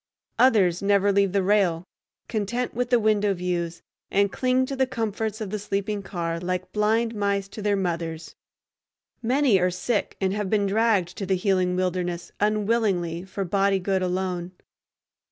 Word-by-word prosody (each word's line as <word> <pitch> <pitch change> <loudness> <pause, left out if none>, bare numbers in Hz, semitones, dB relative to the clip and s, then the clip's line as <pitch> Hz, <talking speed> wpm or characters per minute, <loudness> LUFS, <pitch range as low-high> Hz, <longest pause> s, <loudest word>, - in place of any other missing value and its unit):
Others 200 -9 +4
never 200 0 +3
leave 200 -1 +2
the 195 0 +1
rail, 185 -4 +2 0.4
content 235 +3 -2
with 245 +1 -2
the 245 -1 +4
window 210 -2 +2
views, 175 -1 -3 0.3
and 200 0 +2
cling 255 0 +1
to 275 - -4
the 265 -1 +1
comforts 220 -3 -3
of 210 -4 -5
the 210 - -2
sleeping 200 +1 -2
car 170 -3 -3
like 180 +1 -3
blind 225 +2 +1
mice 200 -2 -1
to 210 - -8
their 205 0 +1
mothers. 170 -3 -3 0.9
Many 245 -3 +3
are 180 0 +2
sick 200 +5 -2
and 190 -1 0
have 210 -2 -2
been 205 -1 +2
dragged 200 -4 +1
to 195 - -4
the 190 - +2
healing 185 -1 +1
wilderness 180 -1 -2
unwillingly 205 -5 0
for 190 +1 -4
body 195 +2 +2
good 190 0 0
alone. 180 -1 -2
200 Hz, 160 wpm, -25 LUFS, 180-215 Hz, 0.9 s, Others